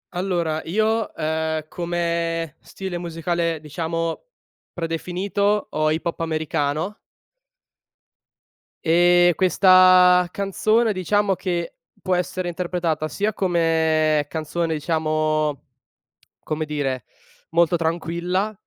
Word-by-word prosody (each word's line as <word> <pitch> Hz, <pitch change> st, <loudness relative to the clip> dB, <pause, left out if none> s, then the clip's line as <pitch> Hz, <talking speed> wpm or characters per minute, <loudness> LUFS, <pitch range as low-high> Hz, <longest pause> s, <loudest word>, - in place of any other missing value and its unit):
Allora 175 Hz, -4 st, -1 dB
io, 220 Hz, +5 st, 0 dB
uhm, 160 Hz, 0 st, -2 dB
come 170 Hz, -2 st, -2 dB
stile 190 Hz, -3 st, -6 dB
musicale, 170 Hz, -1 st, -2 dB
diciamo 165 Hz, -, -3 dB, 0.5 s
predefinito, 185 Hz, +5 st, -1 dB
ho 155 Hz, 0 st, +1 dB
hip 160 Hz, +2 st, -2 dB
hop 170 Hz, -, -3 dB
americano. 155 Hz, +3 st, -2 dB, 1.9 s
Ehm, 175 Hz, +1 st, +5 dB
questa 185 Hz, -1 st, +6 dB
canzone, 215 Hz, +3 st, +1 dB
diciamo 195 Hz, +1 st, +1 dB
che 175 Hz, -2 st, -3 dB, 0.3 s
può 185 Hz, -1 st, 0 dB
essere 180 Hz, 0 st, -2 dB
interpretata 170 Hz, -3 st, -2 dB
sia 205 Hz, +6 st, -1 dB
come 160 Hz, -5 st, +1 dB
canzone, 160 Hz, +2 st, -2 dB
diciamo, 155 Hz, -1 st, 0 dB, 0.8 s
come 155 Hz, 0 st, -3 dB
dire, 140 Hz, -5 st, -3 dB, 0.5 s
molto 170 Hz, +1 st, +3 dB
tranquilla; 170 Hz, +5 st, -1 dB
170 Hz, 90 wpm, -22 LUFS, 160-185 Hz, 1.9 s, questa